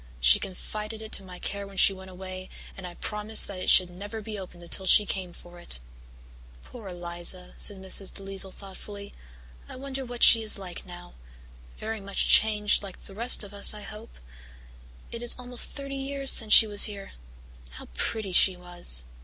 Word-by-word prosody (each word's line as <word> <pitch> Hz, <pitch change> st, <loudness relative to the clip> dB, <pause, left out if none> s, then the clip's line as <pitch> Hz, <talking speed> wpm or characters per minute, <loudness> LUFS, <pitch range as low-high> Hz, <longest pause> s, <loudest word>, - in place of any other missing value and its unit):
She -, -, +5 dB
confided 215 Hz, +3 st, -7 dB
it 220 Hz, -, -9 dB
to -, -, +2 dB
my 180 Hz, -1 st, -11 dB
care 200 Hz, +2 st, -4 dB
when 195 Hz, -1 st, -14 dB
she 195 Hz, -, +7 dB
went 190 Hz, 0 st, -12 dB
away, 185 Hz, 0 st, -9 dB, 0.3 s
and 190 Hz, -2 st, -8 dB
I 175 Hz, -, -11 dB
promised 210 Hz, +1 st, +2 dB
that 195 Hz, -2 st, -8 dB
it -, -, -2 dB
should 180 Hz, -1 st, +5 dB
never 205 Hz, +5 st, -8 dB
be 215 Hz, -1 st, -7 dB
opened 180 Hz, -2 st, -11 dB
until 190 Hz, +2 st, -2 dB
she 210 Hz, -, +6 dB
came 185 Hz, -3 st, -2 dB
for 175 Hz, 0 st, -11 dB
it." 60 Hz, -, -3 dB, 0.8 s
"Poor 230 Hz, -5 st, -12 dB
Eliza," 175 Hz, 0 st, -2 dB
said 205 Hz, -, -1 dB
Mrs. 190 Hz, 0 st, +3 dB
DeLisle 195 Hz, -1 st, -4 dB
thoughtfully. 200 Hz, +1 st, -11 dB, 0.6 s
"I -, -, -9 dB
wonder 270 Hz, 0 st, -5 dB
what 245 Hz, -1 st, -3 dB
she 225 Hz, -, +8 dB
is 215 Hz, -1 st, -3 dB
like 185 Hz, -3 st, -9 dB
now. 175 Hz, 0 st, -11 dB, 0.6 s
Very 220 Hz, -1 st, -5 dB
much 195 Hz, 0 st, -1 dB
changed, 210 Hz, -1 st, +5 dB
like 195 Hz, -3 st, -9 dB
all -, -, -19 dB
the 195 Hz, -, -13 dB
rest 235 Hz, +3 st, 0 dB
of 205 Hz, 0 st, -11 dB
us, 200 Hz, +1 st, +2 dB
I 210 Hz, -, -10 dB
suppose. 215 Hz, +2 st, -10 dB, 1.0 s
It 235 Hz, -, -7 dB
is 240 Hz, -, +3 dB
almost 250 Hz, -1 st, -2 dB
thirty 275 Hz, -1 st, -7 dB
years 275 Hz, 0 st, 0 dB
since 220 Hz, -2 st, +2 dB
she 225 Hz, -, +9 dB
was 205 Hz, -1 st, +3 dB
here. 200 Hz, -2 st, -6 dB, 0.6 s
How -, -, -9 dB
pretty 205 Hz, -, -3 dB
she 185 Hz, +1 st, +5 dB
was!" 175 Hz, -, +2 dB
200 Hz, 190 wpm, -26 LUFS, 185-220 Hz, 1.0 s, she